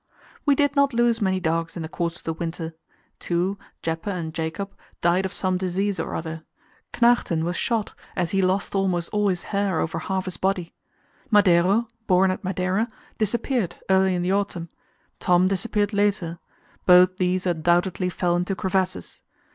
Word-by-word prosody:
We 285 - +6
did 285 0 +2
not 280 -3 +3
lose 235 -1 +3
many 190 -2 +1
dogs 165 0 -1
in 165 - -4
the - - -4
course 170 0 -2
of - - -16
the 165 - -2
winter. 165 0 -5 0.5
Two 180 +3 -1 0.2
Jeppe 165 +4 -2
and 170 -5 -3
Jakob 170 +4 -4 0.3
died 180 +3 +2
of - - -12
some 185 -1 0
disease 190 +1 -1
or - - -3
other. 160 0 -5 0.5
Knægten 235 -9 +3
was 175 +1 -1
shot, 225 +3 -1 0.2
as 175 -2 -1
he 195 - +2
lost 185 +1 +1
almost 185 -3 0
all 210 -1 +1
his 185 -2 0
hair 200 -4 +1
over 165 - -1
half 190 -1 -2
his 185 - -5
body. 190 -3 -1 0.6
Madeiro, 200 +2 +4 0.2
born 185 0 +4
at 185 - -5
Madeira, 190 +4 0 0.3
disappeared 220 -2 0 0.2
early 190 -1 +4
in 175 - -1
the 185 +2 +1
autumn; 195 -4 -2 0.5
Tom 180 0 +4
disappeared 205 +1 0
later 200 -5 0 0.5
both 180 0 +7
these 185 0 0
undoubtedly 175 +2 +1
fell 175 -1 0
into 180 +2 -1
crevasses. 185 - -2
185 Hz, 165 wpm, -24 LUFS, 175-200 Hz, 0.6 s, both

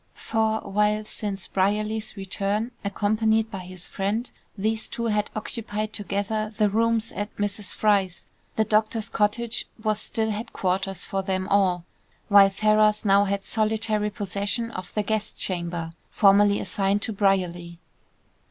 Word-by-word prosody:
For 220 -1 0
while 210 +1 +1
since 200 -3 -4
Brierley's 210 +3 -1
return, 200 +4 -1
accompanied 220 +2 +1
by 195 - -5
his 185 -1 -8
friend, 210 +5 -2 0.3
these 220 +2 -1
two 235 - -4
had 210 -2 +1
occupied 215 -1 -4
together 205 +2 -2
the 210 -2 +3
rooms 225 +1 +1
at 205 +2 -5
Mrs. 205 0 -2
Fry's, 195 -4 +1 0.3
the 220 - +3
doctor's 215 +1 +1
cottage 225 +2 0 0.2
was 215 -1 +1
still 220 -1 -1
headquarters 195 -3 -2
for 195 - -2
them 190 -1 -2
all, 185 -3 +2 0.4
while 200 -1 +8
Ferrars 215 +1 +3
now 200 0 +5
had 200 0 -2
solitary 215 -1 0
possession 205 +3 -2
of 185 -3 -7
the 210 - +1
guest 215 +1 -2
chamber, 170 -2 -2 0.2
formerly 200 0 +5
assigned 200 +1 0
to 220 - -2
Brierly. 180 -4 0
205 Hz, 135 wpm, -25 LUFS, 195-215 Hz, 0.4 s, while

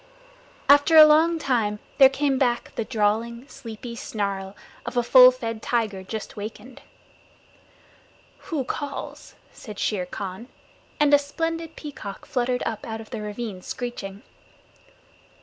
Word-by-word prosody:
After 285 +3 +6
a 310 - +12
long 320 +2 +4
time 230 -8 0 0.2
there 270 -1 +9
came 270 -1 0
back 240 -3 0
the - - -2
drawling, 230 +2 -1
sleepy 235 -1 -9
snarl 200 -3 -4 0.3
of 245 - -5
a 240 - +3
full 255 +1 +9
fed 230 -3 -5
tiger 220 -6 -1
just 215 +3 -7
wakened. 220 +4 -8 1.7
"Who 305 -5 -1
calls?" 280 +2 -6 0.2
said 210 -4 -10
Shere 190 -4 -1
Khan, 190 +5 -6 0.5
and 295 -1 +4
a 290 - +8
splendid 325 +3 -4
peacock 245 -10 -8
fluttered 250 -1 -1
up 220 -2 -3
out 225 0 -5
of 220 - -11
the 225 -3 -4
ravine 210 -2 -5
screeching. 205 -4 -6
235 Hz, 130 wpm, -24 LUFS, 210-275 Hz, 1.7 s, a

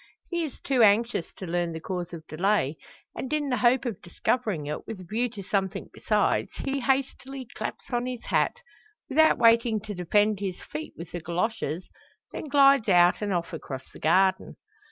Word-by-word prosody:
He 345 -1 0
is 300 - -6
too 265 -3 +1
anxious 220 -3 +3
to 190 - -8
learn 175 -1 -1
the 160 - -5
cause 180 +1 -4
of 165 -2 -8
delay; 165 -3 +1 0.4
and, 260 - -5
in 300 -2 0
the 250 - +1
hope 245 +3 +3
of 230 -6 -4
discovering 190 - -1
it, 150 +1 -5
with 220 -4 -6
a - - -9
view 225 +7 -1
to 210 -3 -8
something 195 0 -2
besides, - - +1 0.2
he 275 0 -1
hastily 270 +1 -1
claps 215 - -6
on 245 0 0
his 250 -2 -5
hat 485 - 0 0.5
without 315 +3 +5
waiting 230 -1 +4
to 210 0 -6
defend 205 +3 +2
his 190 -3 -4
feet 155 +1 -7
with 170 +1 -8
the 175 - -4
goloshes 170 -1 -2 0.4
then - - -6
glides 275 -5 +5
out 175 0 +5
and 205 -1 -1
off 175 -2 -2
across 130 -4 -7
the - - -13
garden. 190 +4 +2
210 Hz, 185 wpm, -27 LUFS, 175-250 Hz, 0.5 s, without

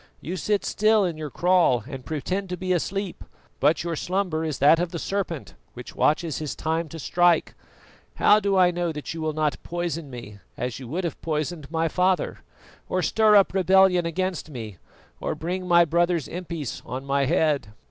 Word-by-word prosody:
You 175 - -5
sit 205 +2 0
still 215 -1 +3
in 170 -3 -2
your 155 -1 -6
kraal 170 - +3
and 135 -3 -7
pretend 180 +7 -3
to 180 - -3
be 185 +1 -1
asleep, 195 +2 -3 0.4
but 150 +4 +3
your 170 -1 -2
slumber 180 -1 -1
is 155 -3 -2
that 150 +4 +5
of 175 0 -1
the 170 - -5
serpent 180 -4 -3 0.2
which 125 - -9
watches 155 0 +1
his 155 -2 -4
time 160 0 -2
to 165 - -8
strike. 175 +2 +2 0.6
How 210 - +5
do 200 -2 +1
I 180 -1 +5
know 175 -1 -1
that 150 +1 -6
you 165 - -6
will 155 -1 -1
not 155 -1 -1
poison 170 -3 -4
me 115 -5 -9 0.2
as 125 +1 -3
you 130 - -8
would 170 +9 -3
have 170 - -4
poisoned 155 -1 -3
my 165 0 0
father, 180 +2 0 0.5
or - - 0
stir 215 -1 +4
up 200 -2 +5
rebellion 190 -2 +4
against 185 -1 -2
me, 110 - -7 0.4
or - - -2
bring 180 +2 -4
my 170 -1 +6
brother's 170 -1 +1
impis 170 -6 -5
on 130 +3 -6
my 140 0 +1
head?" 155 -4 +1
170 Hz, 190 wpm, -25 LUFS, 150-185 Hz, 0.6 s, my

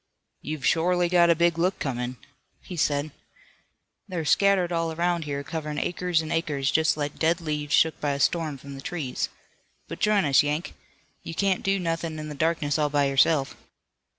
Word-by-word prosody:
"You've 150 -3 -5
shorely 175 +1 +2
got 175 -1 +5
a 170 - +5
big 170 0 +2
look 185 +3 +1
comin'," 125 -6 -3 0.5
he 180 - -8
said. 150 -1 0 1.0
"They're 175 -5 -4
scattered 195 +1 +3
all 165 -1 0
around 170 0 -1
here, 140 -1 -3
coverin' 150 0 -5
acres 175 -1 0
an' 155 - -6
acres, 145 -5 0
just 160 -1 +2
like 145 -1 -4
dead 165 +2 +2
leaves 150 -3 -1
shook 160 -1 +2
by 145 -1 0
a 140 - -4
storm 155 -1 0
from 140 +1 -10
the 135 - -8
trees. 145 -5 -3 0.6
But - - -7
j'in 210 -4 +3
us, 140 -2 +5
Yank. 150 +3 -2 0.5
You 165 - -7
can't 195 0 +1
do 195 0 +1
nothin' 165 -2 -3
in 155 0 -6
the - - -5
darkness 155 -1 0
all 150 -1 +2
by 145 -1 +2
yourself. 135 +1 +2
160 Hz, 180 wpm, -26 LUFS, 145-175 Hz, 1.0 s, got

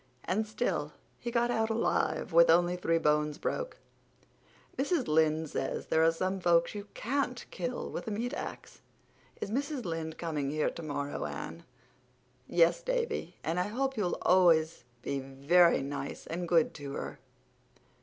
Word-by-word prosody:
And 215 +4 0
still 165 -9 -2 0.3
he 240 - -4
got 240 0 +1
out 225 -1 +1
alive, 225 -4 0
with 170 0 +7
only 175 +2 +4
three 165 -2 +1
bones 150 -1 +1
broke. - - -3 1.0
Mrs. 280 0 0
Lynde 155 0 +2
says - - -2
there 160 - +2
are 165 - +5
some 185 +3 -2
folks 170 -1 +3
you 205 -1 -7
can't 250 0 -1
kill 250 0 -3
with - - -5
a - - 0
meat 235 +4 -2
axe. - - -7 0.6
Is 200 - -3
Mrs. 280 +1 -2
Lynde 165 -2 -4
coming 150 -5 -2
here 155 +1 0
tomorrow, 145 -3 -4
Anne?" 170 - -7 0.8
"Yes, 170 0 +3
Davy, - - -2
and 165 +3 -1
I 180 - 0
hope 265 +5 -1
you'll 205 -6 0
be - - -2
always 165 -5 +4 0.2
very 140 +5 +3
nice 140 0 -5
and 170 +1 -4
good 165 -3 +3
to 140 -2 -7
her." - - -5
170 Hz, 155 wpm, -31 LUFS, 155-220 Hz, 1.0 s, with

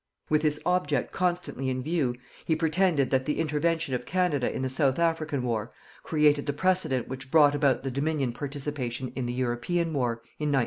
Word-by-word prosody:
With 155 0 +4
this 150 -1 +1
object 180 0 +1
constantly 175 -7 -1
in 130 0 -2
view, 150 -5 0 0.3
he 160 - +1
pretended 160 -3 +2
that 130 0 +1
the 150 - 0
intervention 160 0 0
of 125 - -1
Canada 175 -8 +1
in - - -3
the - - +1
South 130 0 +1
African 160 -5 0
War 115 -1 -2 0.3
created 150 -2 +2
the 145 - 0
precedent 180 -7 +1
which 130 0 -7
brought 145 -1 +6
about 140 -3 +2
the 135 - -2
Dominion 140 -2 -1
participation 135 -3 -4
in 130 -2 -2
the 120 - -2
European 130 +7 -1
war, 125 -5 +1 0.3
in 150 -1 0
1914. 135 - +3
145 Hz, 185 wpm, -27 LUFS, 130-160 Hz, 0.3 s, brought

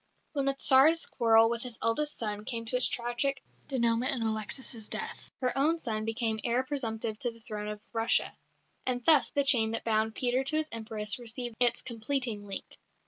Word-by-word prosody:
When 280 -2 -1
the 275 0 0
Tsar's 275 +5 +4
quarrel 225 -1 +4
with 235 0 -2
his 245 -2 -6
eldest 295 +7 0
son 210 -2 -3
came 230 0 -4
to 225 - -2
its 250 - +4
tragic 245 +3 -1 0.2
dénouement 235 -2 +1
in 235 - -3
Alexis' 220 +1 -2
death, - - -4
her 250 -1 0
own 305 +5 +2
son 220 -8 -3
became 225 -1 -1
heir 245 +2 +1
presumptive 225 -5 -2
to 245 - 0
the 230 0 -14
throne 210 -2 -6
of 210 0 -6
Russia. 225 0 +2 0.5
And 245 -1 -1
thus 310 -4 +6
the 285 - +1
chain 235 -5 +5
that 230 - -2
bound 220 0 0
Peter 250 +1 0
to 275 +3 +1
his 310 0 0
Empress 220 -1 -1
received 240 0 -5
its 245 -1 +3
completing 235 -3 -2
link. 195 - -7
235 Hz, 190 wpm, -29 LUFS, 220-260 Hz, 0.5 s, thus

